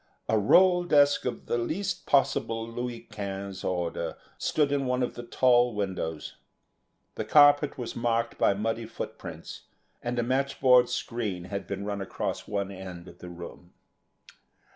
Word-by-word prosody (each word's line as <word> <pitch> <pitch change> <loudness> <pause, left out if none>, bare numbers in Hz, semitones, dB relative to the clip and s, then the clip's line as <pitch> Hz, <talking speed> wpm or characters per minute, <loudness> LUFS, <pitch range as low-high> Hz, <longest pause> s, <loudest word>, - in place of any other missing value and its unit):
A - - +2
roll 180 - +5
desk 145 -4 +4
of 125 - -3
the 120 - 0
least 180 +10 -3
possible 125 -5 +1
Louis 120 0 -5
Quinze 100 -2 -5
order 85 -2 -2 0.2
stood 145 -2 +1
in 140 -2 0
one 125 0 +1
of 125 - -2
the - - -7
tall 120 0 +3
windows; 90 -6 -4 0.8
the - - -3
carpet 145 0 +5
was 120 -3 -5
marked 115 0 -1
by 100 - +3
muddy 115 +2 -2
footprints, 115 - -8 0.4
and 120 0 -3
a 120 - +1
matchboard 130 -1 +3
screen 115 -7 -3
had 95 0 -5
been 100 0 -4
run 100 -1 -3
across 95 - -4
one 100 -1 -2
end 95 -2 -9
of - - -14
the 90 - -9
room. 85 0 -10
115 Hz, 150 wpm, -28 LUFS, 100-130 Hz, 0.8 s, roll